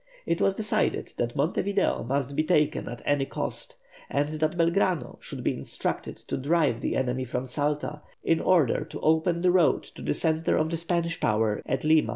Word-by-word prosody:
It 170 - 0
was 195 - +3
decided 215 0 0
that 120 0 -1
Monte 145 +5 +1
Video 200 0 0
must 140 +3 -1
be 155 - +2
taken 155 -2 +1
at 120 -1 -8
any 145 -2 +1
cost, - - -3 0.3
and 145 +1 0
that 155 +2 0
Belgrano 170 -3 +1
should - - -6
be - - +1
instructed - - -3
to - - -5
drive 145 -4 +1
the - - -1
enemy 130 0 0
from 125 +1 -3
Salta, 150 +3 -2 0.2
in 165 - +2
order 165 -10 +3
to - - -8
open 160 +2 +2
the 180 0 +4
road 180 -3 +3
to - - -13
the 75 +1 -1
centre 160 0 +1
of 155 +1 +1
the 165 - 0
Spanish 170 0 -1
power 105 0 +1
at 130 - -1
Lima. 155 0 +4
155 Hz, 190 wpm, -27 LUFS, 130-170 Hz, 0.3 s, the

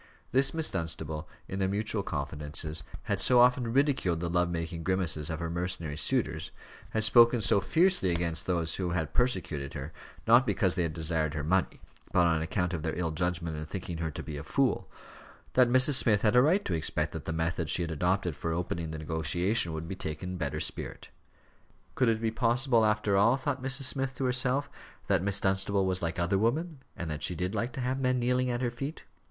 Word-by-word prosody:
This 135 +1 +4
Miss 160 -1 +3
Dunstable, 80 -1 -3 0.2
in 95 - -5
their 95 - +1
mutual 105 +2 -1
confidences, 75 0 -1 0.2
had - - -2
so 125 -1 +4
often 125 -1 +4
ridiculed 130 - +1
the 85 0 -3
love 90 0 +1
making 85 0 -4
grimaces 85 -4 +1
of 80 - -3
her 85 - -3
mercenary 85 -2 -3
suitors 75 - -1 0.4
had 110 - -1
spoken 120 +2 +6
so 100 -1 +3
fiercely 170 - +3
against 85 -2 -1
those 85 -3 0
who 90 -2 -2
had 85 -3 -2
persecuted 85 - -1
her, 75 +2 -6 0.3
not 120 +3 +7
because 95 -5 +1
they 90 - -1
had 85 -2 -1
desired 80 -1 -1
her 75 - -3
money, 90 +4 0 0.3
but 90 -1 +4
on 80 -2 +2
account 90 +2 -1
of 85 - -3
their 80 - -3
ill 85 -2 -1
judgment 85 -1 -2
in 75 - -5
thinking 85 -1 -6
her 80 -1 -2
to 75 - -7
be 75 -2 -6
a 70 - -6
fool 75 - 0 0.6
that 125 -1 +5
Mrs. 130 +3 +5
Smith 110 -6 +4
had 105 +1 +3
a 125 - +7
right 175 +9 +2
to - - -2
expect 80 -2 0
that - - -7
the - - -3
method 80 0 -2
she 85 - +2
had 85 - -4
adopted 90 +1 0
for 80 +2 -3
opening 85 -1 -3
the 80 - -5
negotiation 80 +5 0
would 80 +1 -5
be 95 - -5
taken 80 +1 -5
in 90 - -5
a - - -8
better 70 -3 -2
spirit. - - -4 0.8
Could 125 -3 +2
it 110 -1 +1
be 115 -1 0
possible, 120 0 +2
after 105 -2 +1
all, 115 +6 +4
thought 135 0 -3
Mrs. 135 +1 -1
Smith 135 0 +1
to 130 - -2
herself, 130 +2 +2 0.4
that 95 -3 +2
Miss 100 +1 +2
Dunstable 95 0 +1
was 95 0 -1
like 85 -1 -2
other 85 +3 +1
women, 150 - -1 0.2
and 85 - -4
that 75 - -5
she 90 - -1
did 90 +4 -3
like 120 +3 -2
to 130 - -5
have 130 +2 -1
men 130 -1 +1
kneeling 125 +1 +1
at 120 0 -2
her 120 -2 -1
feet? 135 +6 -6
90 Hz, 215 wpm, -29 LUFS, 80-120 Hz, 0.8 s, not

